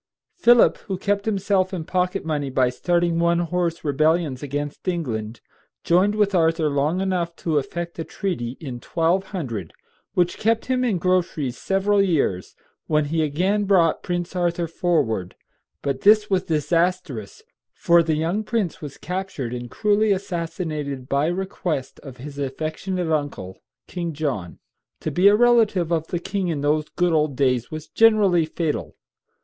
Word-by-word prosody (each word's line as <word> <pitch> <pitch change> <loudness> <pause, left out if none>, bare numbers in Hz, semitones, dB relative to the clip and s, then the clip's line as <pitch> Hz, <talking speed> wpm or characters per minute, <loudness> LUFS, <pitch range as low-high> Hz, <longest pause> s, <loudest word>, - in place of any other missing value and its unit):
Philip, 240 -8 +5
who 190 -2 -2
kept 200 +1 -1
himself 195 -3 +1
in 170 - -4
pocket 180 +1 -1
money 145 -3 -1
by 130 -1 +2
starting 170 +4 +1
one 170 0 +3
horse 175 -1 -1
rebellions 155 -1 +1
against 145 +3 -5
England, 120 -11 -3 0.4
joined 190 +5 +3
with 205 -2 +2
Arthur 165 -3 +2
long 145 +5 +1
enough 180 -3 -1
to 160 -4 0
effect 170 +4 -6
a - - -1
treaty, 135 - -4
in 130 -6 -7
1200, 165 - -1 0.4
which 175 -1 +1
kept 225 +1 +1
him 255 -1 0
in 225 -7 +1
groceries 170 -7 0
several 195 +6 +1
years, 150 - 0 0.3
when 150 -1 +2
he 165 - +2
again 185 +8 +1
brought 180 -5 +3
Prince 175 0 -3
Arthur 175 -1 0
forward; 155 - -1 0.5
but 140 -2 -2
this 210 0 +5
was 190 -1 +1
disastrous, 165 - -1 0.3
for 170 0 +4
the 160 -1 0
young 170 +7 -1
prince 215 -6 -2
was 145 -3 -8
captured 180 -9 -4
and 120 -1 -6
cruelly 210 - +2
assassinated 165 -7 -3
by 140 +3 +1
request 175 -6 -3
of 135 -3 -11
his 140 +2 -9
affectionate 160 +6 -3
uncle, 145 -11 -3 0.3
King 170 -2 -4
John. 135 - -3 0.4
To - - -2
be 180 +3 +4
a 205 - +7
relative 220 -7 +3
of 160 -1 0
the 175 - -2
king 190 +2 -2
in 155 -4 -2
those 150 +1 +1
good 175 -1 +1
old 150 -3 +1
days 125 -3 +1
was 155 0 -7
generally 205 -7 +4
fatal. 160 -1 -3
170 Hz, 155 wpm, -23 LUFS, 145-185 Hz, 0.5 s, a